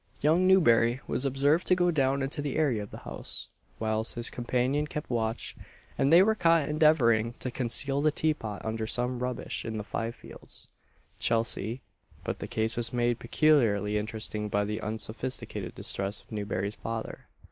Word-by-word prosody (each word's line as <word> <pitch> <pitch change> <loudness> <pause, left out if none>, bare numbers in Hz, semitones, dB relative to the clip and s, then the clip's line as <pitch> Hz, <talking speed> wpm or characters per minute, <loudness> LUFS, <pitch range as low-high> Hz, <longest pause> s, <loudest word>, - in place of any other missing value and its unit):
Young 165 +5 +3
Newberry 120 -10 +5
was 135 - -2
observed 140 +5 +2
to 185 - +5
go 175 -1 +2
down 135 -3 +1
into 135 +2 -3
the 145 -2 -3
area 135 -9 +1
of 100 - -7
the - - -9
house, 65 +1 -3 0.3
whilst 110 0 -1
his 120 0 +2
companion 130 +4 0
kept 150 -2 -6
watch, 115 -1 -2 0.4
and 135 - +2
they 170 +3 +8
were 220 +2 +3
caught 165 -7 +3
endeavouring 130 -8 +3
to 125 - -5
conceal 135 +3 0
the 155 - +4
tea 155 +1 +1
pot 105 -7 -7
under 110 0 -2
some 125 +2 0
rubbish 125 0 -3
in 110 -1 -4
the 105 - -3
Five 115 +2 -3
fields, - - -9 0.5
Chelsea; 115 +1 0 0.4
but - - -3
the - - -5
case 110 +1 -1
was 120 -1 +1
made 120 -1 +1
peculiarly 115 -7 +3
interesting 105 0 -3
by 100 0 +1
the 105 +2 -3
unsophisticated 110 +4 -4
distress 100 +1 -2
of - - -28
Newberry's 100 -1 -2
father. 115 0 -5
120 Hz, 170 wpm, -29 LUFS, 110-145 Hz, 0.5 s, they